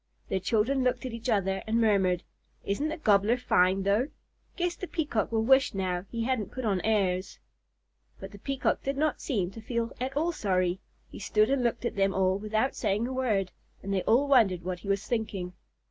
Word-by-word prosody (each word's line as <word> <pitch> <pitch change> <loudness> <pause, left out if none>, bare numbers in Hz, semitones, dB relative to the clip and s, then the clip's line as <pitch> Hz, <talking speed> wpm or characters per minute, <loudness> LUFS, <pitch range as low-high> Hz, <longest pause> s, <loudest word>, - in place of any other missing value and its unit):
Their 190 - 0
children 235 +7 +1
looked 250 +1 0
at 250 - -4
each 230 +2 -5
other 195 -3 +1
and 225 +1 +1
murmured, 190 -5 +2 0.4
"Isn't 200 +10 -1
the 315 - -4
Gobbler 215 - +3
fine 190 -5 +2
though? 205 +7 +2 0.5
Guess 350 -1 -1
the 370 - -6
Peacock 295 - -1
will 220 -1 +1
wish 265 0 +4
now 185 -2 -1
that 195 - -20
he 230 -1 -3
hadn't 245 -4 -1
put 255 -2 -5
on 195 -4 +1
airs." 190 -4 0 0.8
But - - -8
the 200 - -12
Peacock 275 +4 -1
did 275 0 -3
not 305 +1 0
seem 195 -9 -1
to 225 - -10
feel 230 0 -2
at 265 +2 -2
all 330 +3 +1
sorry. 185 - 0 0.3
He - - -9
stood 215 +3 +2
and 275 -2 +1
looked 240 0 -1
at - - -2
them 195 -1 +1
all 190 0 +2
without 215 +5 0
saying 210 +1 0
a 260 - -4
word, 215 -8 0 0.3
and 195 - -3
they 190 - +1
all 255 +6 +3
wondered 210 -10 +4
what 180 0 -4
he 185 - -11
was 200 +1 0
thinking. 210 -6 -3
220 Hz, 210 wpm, -28 LUFS, 195-255 Hz, 0.8 s, wish